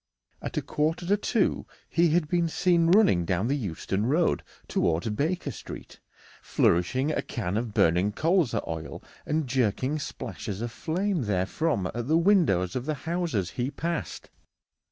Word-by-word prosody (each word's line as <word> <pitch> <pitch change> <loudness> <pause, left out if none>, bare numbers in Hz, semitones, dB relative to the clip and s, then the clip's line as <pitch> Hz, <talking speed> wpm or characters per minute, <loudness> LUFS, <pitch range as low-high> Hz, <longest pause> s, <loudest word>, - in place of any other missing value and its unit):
At - - -5
a - - 0
quarter 160 +3 -1
to 200 +4 +3
two 210 0 0 0.2
he 170 0 +3
had 160 0 +2
been 170 +1 +1
seen 170 0 +2
running 180 - +5
down 90 +3 0
the 140 - +1
Euston 100 - -2
Road 160 +6 +2 0.3
towards 85 +5 0
Baker 150 +7 -1
Street, - - -10 0.4
flourishing 130 - +1
a - - 0
can 100 -7 -3
of 115 0 -1
burning 90 +1 +3
colza 165 - +1
oil 80 -1 -6 0.2
and 155 0 0
jerking 130 +3 0
splashes 100 -7 -6
of 120 +1 -3
flame 175 - -1
therefrom 100 - 0
at 120 +1 -4
the 160 +2 +4
windows 165 - +3
of 130 +2 -3
the 155 - 0
houses 160 - -1
he 125 +1 -2
passed. 165 +3 -4
140 Hz, 155 wpm, -27 LUFS, 105-170 Hz, 0.4 s, running